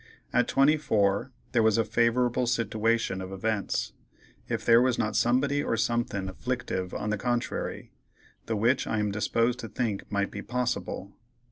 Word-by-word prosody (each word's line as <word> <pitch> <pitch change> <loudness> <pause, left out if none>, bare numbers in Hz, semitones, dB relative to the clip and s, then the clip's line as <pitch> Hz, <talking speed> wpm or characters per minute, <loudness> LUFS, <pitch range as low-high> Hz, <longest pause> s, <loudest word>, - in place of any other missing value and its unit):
At 125 -1 +3
24 130 -7 +2 0.2
there 120 - +3
was 110 -1 +4
a 115 - +2
favorable 120 +2 +2
sitiwation 115 -4 0
of 95 - -7
events, 100 +1 -2 0.6
if - - -2
there 115 0 +7
was 125 -1 +2
not 110 - -1
somebody 140 +4 +2
or 115 - -1
somethin' 110 -3 -1
afflictive 95 -3 -3
on 105 0 -3
the 110 - -1
contrary, 120 +1 -2 0.6
the 115 - 0
which 120 +5 +2
I 110 - -1
am 105 -1 0
disposed 115 +4 0
to 115 - -5
think 110 -6 -3
might 100 -1 0
be 105 - -6
possible. 120 -5 -3
115 Hz, 155 wpm, -28 LUFS, 105-125 Hz, 0.6 s, there